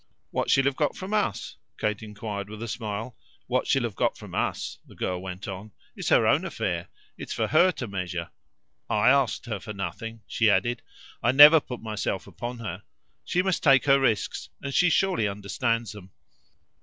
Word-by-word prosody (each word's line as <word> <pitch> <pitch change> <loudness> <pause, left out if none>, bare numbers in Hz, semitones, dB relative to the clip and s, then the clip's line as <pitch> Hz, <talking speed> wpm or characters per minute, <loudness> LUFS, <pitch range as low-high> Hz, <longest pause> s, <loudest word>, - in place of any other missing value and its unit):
"What - - -1
she'll 135 - +4
have 140 -1 +1
got 150 0 0
from 190 +2 -5
US?" 210 -2 -1 0.2
Kate 105 -1 -1
put 105 -1 -6
it 100 - -9
with 110 +1 -7
a - - -4
smile. 110 +1 -5 0.3
"What 125 +1 0
she'll 135 -2 +2
have 115 -3 -2
got - - 0
from - - -11
us," - - -2
the - - -15
girl 90 -1 -2
went 95 +2 -7
on, 100 +2 -7 0.2
"is - - -3
her - - +5
own - - +3
affair - - -3 0.3
it's - - -5
for - - 0
HER 175 +4 +5
to 125 - -5
measure. 90 -4 -4 0.6
I 105 +4 +4
asked 135 -3 +2
her 110 -4 -4
for 105 +2 -7
nothing," 105 +4 -6
she 110 -1 +2
added; 120 +3 +1 0.4
"I 120 - +3
never 150 +4 +10
put 125 -5 -8
myself 110 -3 -3
upon 120 +1 -6
her. 115 -3 -6 0.4
She 180 - 0
must 190 -2 0
take 135 -3 +5
her 140 -1 +5
risks, 115 -7 0
and 140 0 -5
she 180 +4 +4
surely 180 - +2
understands 105 +3 -2
them. 100 -3 -11
115 Hz, 195 wpm, -26 LUFS, 105-135 Hz, 0.6 s, never